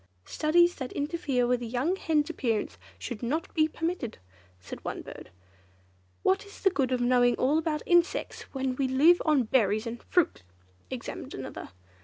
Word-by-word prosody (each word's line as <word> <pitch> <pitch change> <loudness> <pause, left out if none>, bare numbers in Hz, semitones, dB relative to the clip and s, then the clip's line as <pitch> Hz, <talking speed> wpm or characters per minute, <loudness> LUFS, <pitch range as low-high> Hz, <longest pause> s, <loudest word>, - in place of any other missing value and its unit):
"Studies 345 +3 +3
that 260 -2 -5
interfere 290 -4 0
with 245 0 +1
a - - -3
young 255 +10 0
hen's 310 -5 +1
appearance 230 -9 -2 0.2
should 240 -4 -6
not 290 +7 -2
be 310 -1 +3
permitted," 325 -7 -3 0.4
said 90 - -9
one - - -4
bird. - - -10 0.9
"What 190 - +2
is 405 - -14
the 385 - +4
good 270 -7 0
of 250 -1 +1
knowing 245 0 +4
all 285 +5 +2
about 310 -2 -2
insects, 345 0 +1
when 265 -1 -2
we 270 - +1
live 300 +7 +5
on 300 -5 +4
berries 215 -2 +2
and 230 0 -5
fruit!" 355 - +1 0.5
exclaimed - - -6
another. - - -7
270 Hz, 165 wpm, -28 LUFS, 245-325 Hz, 0.9 s, live